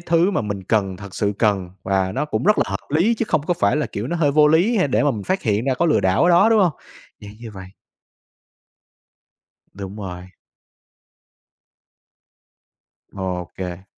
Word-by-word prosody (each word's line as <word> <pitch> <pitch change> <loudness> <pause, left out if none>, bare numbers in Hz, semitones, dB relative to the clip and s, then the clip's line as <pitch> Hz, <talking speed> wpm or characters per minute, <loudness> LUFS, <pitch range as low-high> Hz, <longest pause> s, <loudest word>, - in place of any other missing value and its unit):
thứ 170 +2 +2
mà - - 0
mình 105 -3 -4
cần, 95 -3 0
thật 100 -1 -11
sự 100 0 0
cần 100 -5 +1
và 95 -1 0
nó - - -1
cũng 150 - -3
rất 210 +2 +3
là - - +3
hợp 100 +6 -6
lý 175 +11 +2
chứ 230 - -2
không 155 -2 +1
có 175 - +1
phải 100 -3 +1
là, 150 - -1
kiểu, 105 +4 -5
nó 175 - -2
hơi 150 -4 +2
vô 150 0 +5
lý, 180 +10 +3
hay 185 -8 +2
để 130 - +1
mà 145 - +3
mình 105 -5 -5
phát 190 +1 -1
hiện 105 +1 0
ra 135 -1 +1
có 170 - 0
lừa 155 - +3
đảo 95 0 +2
ở - - +4
đó, 190 +6 +5
đúng 220 -2 +4
không? 175 -4 +2 0.5
Dạng 105 0 -10
như 115 -1 -9
vậy. 95 -3 -10 2.1
Đúng 100 +1 -8
rồi. 90 -3 -7 2.8
Ô 90 -3 -4
kê. 90 0 -6
110 Hz, 195 wpm, -21 LUFS, -, 2.8 s, vô